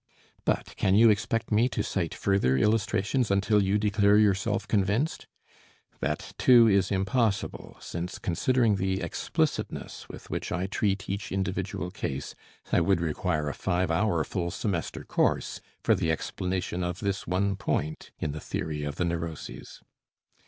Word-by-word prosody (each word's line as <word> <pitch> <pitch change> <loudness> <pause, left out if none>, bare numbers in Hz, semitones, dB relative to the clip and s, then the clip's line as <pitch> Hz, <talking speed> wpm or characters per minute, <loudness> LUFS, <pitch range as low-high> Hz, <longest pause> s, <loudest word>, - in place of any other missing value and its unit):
But - - -1
can 95 - +3
you 115 +1 +7
expect 115 +3 -1
me 115 +4 +4
to - - -2
cite 85 -5 -2
further 95 -10 +2
illustrations 105 - +1
until 100 +2 +3
you 100 +1 +2
declare 105 0 +3
yourself 105 +1 +2
convinced? 105 - 0 0.7
That 75 +3 -3
too 120 -2 +7
is 100 -3 +3
impossible, 100 +2 -1
since 85 +2 -5
considering 115 +4 +2
the 95 0 0
explicitness - - -2
with - - -10
which - - -3
I 90 +1 -1
treat 100 0 -1
each 100 +2 -4
individual 95 -2 -2
case, 70 -3 -4 0.4
I - - +4
would 95 +1 +3
require 80 -1 -1
a 70 - -2
five 90 -1 0
hour 85 -2 +2
full 85 -1 -2
semester 85 -2 -3
course - - 0 0.2
for - - +4
the 80 - +1
explanation 90 +2 -2
of 90 +1 -3
this 100 -1 -2
one 100 +2 +1
point 80 -5 -2
in 75 - -2
the 75 +1 -6
theory 75 -2 -3
of 75 0 -3
the 90 - 0
neuroses. 85 -2 -5
95 Hz, 150 wpm, -28 LUFS, 85-105 Hz, 0.7 s, you